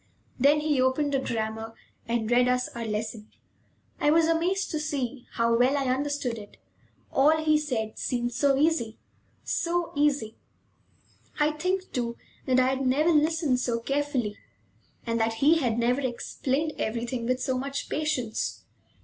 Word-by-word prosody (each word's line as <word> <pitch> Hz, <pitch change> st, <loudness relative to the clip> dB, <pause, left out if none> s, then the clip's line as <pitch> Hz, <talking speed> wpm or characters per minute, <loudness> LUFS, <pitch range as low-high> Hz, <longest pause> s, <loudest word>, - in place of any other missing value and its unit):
Then 290 Hz, +3 st, +4 dB
he 295 Hz, -3 st, +1 dB
opened 280 Hz, +3 st, +1 dB
a 275 Hz, -, +3 dB
grammar 225 Hz, -2 st, -3 dB, 0.3 s
and 230 Hz, -1 st, -1 dB
read 245 Hz, +1 st, +5 dB
us 250 Hz, 0 st, +1 dB
our 235 Hz, -1 st, -6 dB
lesson. 215 Hz, 0 st, -4 dB, 0.7 s
I 295 Hz, -, +3 dB
was 325 Hz, +2 st, +5 dB
amazed 345 Hz, +4 st, +1 dB
to 310 Hz, -, -1 dB
see 275 Hz, -4 st, -3 dB
how 230 Hz, 0 st, +2 dB
well 255 Hz, +4 st, +3 dB
I 265 Hz, -2 st, +1 dB
understood 275 Hz, -4 st, -2 dB
it. 205 Hz, -1 st, -13 dB, 0.5 s
All 300 Hz, +4 st, +4 dB
he 310 Hz, -1 st, +3 dB
said 235 Hz, -8 st, -3 dB
seemed 240 Hz, -1 st, -1 dB
so 275 Hz, +2 st, +2 dB
easy, 285 Hz, -7 st, +1 dB, 0.5 s
so 345 Hz, 0 st, -1 dB
easy! 285 Hz, -7 st, +1 dB, 1.0 s
I 300 Hz, 0 st, +3 dB
think, 365 Hz, +5 st, -2 dB
too, 235 Hz, -2 st, -2 dB, 0.3 s
that 255 Hz, -1 st, +4 dB
I 255 Hz, -, +4 dB
had 265 Hz, +1 st, 0 dB
never 300 Hz, +6 st, +3 dB
listened 305 Hz, -3 st, +2 dB
so 235 Hz, -2 st, -1 dB
carefully, 270 Hz, -4 st, -1 dB, 0.7 s
and 230 Hz, -1 st, -1 dB
that 225 Hz, 0 st, +1 dB
he 300 Hz, +8 st, +4 dB
had 240 Hz, -6 st, 0 dB
never 245 Hz, +3 st, +1 dB
explained 270 Hz, +4 st, -2 dB
everything 235 Hz, +1 st, -2 dB
with 255 Hz, 0 st, +1 dB
so 260 Hz, 0 st, -1 dB
much 275 Hz, +2 st, -3 dB
patience. 280 Hz, -8 st, -2 dB
260 Hz, 155 wpm, -27 LUFS, 235-300 Hz, 1.0 s, read